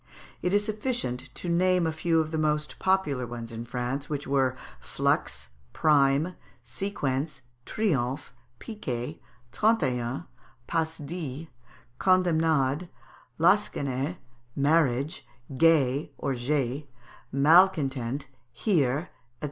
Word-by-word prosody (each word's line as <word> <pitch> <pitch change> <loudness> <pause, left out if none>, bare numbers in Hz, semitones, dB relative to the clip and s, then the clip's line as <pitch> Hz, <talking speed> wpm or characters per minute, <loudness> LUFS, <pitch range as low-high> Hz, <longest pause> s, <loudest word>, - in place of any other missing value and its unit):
It 180 - 0
is 205 +1 +3
sufficient 215 - -2
to - - -5
name 180 +1 +3
a 160 - +1
few 165 +1 +1
of 155 -1 -1
the 160 - -1
most 150 0 0
popular 150 -10 +1
ones 115 0 -7
in 115 +1 -6
France, 125 +4 -3
which 145 -2 -3
were, 135 -2 +1 0.2
Flux, 65 0 -1 0.2
Prime, 150 +2 +3 0.3
Sequence, 140 -1 -3 0.3
Triomphe, 140 - -1 0.2
Piquet, 150 - -5 0.3
Trente 220 - +3
et 125 -3 +1
un, 130 +8 -4 0.4
Passe 160 +1 -1
dix, 155 -1 -6 0.5
Condemnade, 160 -4 +2 0.5
Lansquenet, 160 -5 +1 0.4
Marriage, 145 +1 +2 0.3
Gay, 145 -3 +3
or 140 - -1
J'ai, 135 +2 -1 0.4
Malcontent, 140 -4 +3 0.3
Hère, 150 - +2
&c. - - -15
150 Hz, 110 wpm, -27 LUFS, 130-170 Hz, 0.5 s, is